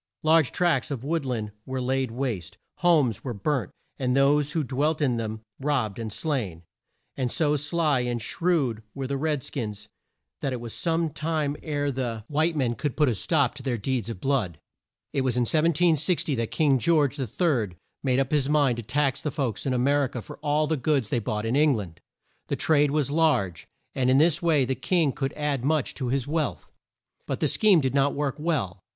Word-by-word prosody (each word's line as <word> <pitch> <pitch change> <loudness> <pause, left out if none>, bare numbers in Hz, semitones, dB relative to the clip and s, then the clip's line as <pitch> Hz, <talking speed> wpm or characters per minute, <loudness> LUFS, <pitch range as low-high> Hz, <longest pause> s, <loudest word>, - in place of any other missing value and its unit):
Large 155 -3 +4
tracts 170 -8 +1
of 135 -4 -4
wood 155 -1 -1
land 110 -4 -2
were 130 +2 -4
laid 130 0 0
waste; 115 -7 -4 0.2
homes 150 - +3
were 125 -4 -4
burnt, 125 +1 -1 0.3
and 130 -1 +1
those 145 +1 +3
who 160 - 0
dwelt 145 +4 0
in 130 -6 +1
them 110 -1 -4 0.2
robbed 130 -7 -1
and 110 -2 -4
slain; 110 - -3 0.5
and 125 -3 -1
so 150 -3 +1
sly 150 -1 +1
and 120 -1 -1
shrewd 135 -4 0
were 135 -1 -3
the 140 +1 -2
red 150 -1 -1
skins 105 -5 -5 0.5
that 135 - -2
it 125 - -3
was 115 -1 -7
some 165 -1 0
time 155 -1 -1
ere 145 -2 -1
the 120 -4 -3
white 155 +3 +1
men 130 -5 +1
could 130 +4 -3
put 150 -3 +4
a - - +1
stop 135 - +1
to - - -8
their 125 -3 -1
deeds 120 0 -2
of 110 -5 -5
blood. 110 - 0 0.6
It 135 - +1
was 130 -2 0
in - - +3
1760 160 +3 +2
that 115 -3 -1
King 140 -4 +2
George 150 -1 +3
the 135 -4 -3
Third 115 - 0 0.3
made 130 -2 +1
up 135 -1 0
his 145 -2 +2
mind 145 -5 +3
to 120 - -4
tax 140 +3 0
the 150 - -2
folks 135 -4 -2
in - - +1
A - - +1
mer 140 +3 +3
i - - -2
ca 120 -1 -6
for - - -11
all 150 +1 +1
the 155 +1 0
goods 135 -4 0
they 120 - +1
bought 105 0 -3
in 115 +3 0
Eng 150 -1 +4
land. 95 -7 -7 0.5
The - - -1
trade 150 -2 +3
was 145 -1 0
large, 120 - +1 0.3
and 130 -1 +1
in 130 - +5
this 160 +1 +4
way 155 -6 +3
the 130 - 0
king 165 +1 +1
could 135 -1 -3
add 150 -4 -2
much 155 0 +1
to 130 - -4
his 130 0 0
wealth. 145 - -2 0.6
But - - -2
the - - +2
scheme 205 -7 +4
did 130 -2 -1
not 140 0 +2
work 145 -2 -1
well. 145 - -1
135 Hz, 210 wpm, -26 LUFS, 120-150 Hz, 0.6 s, in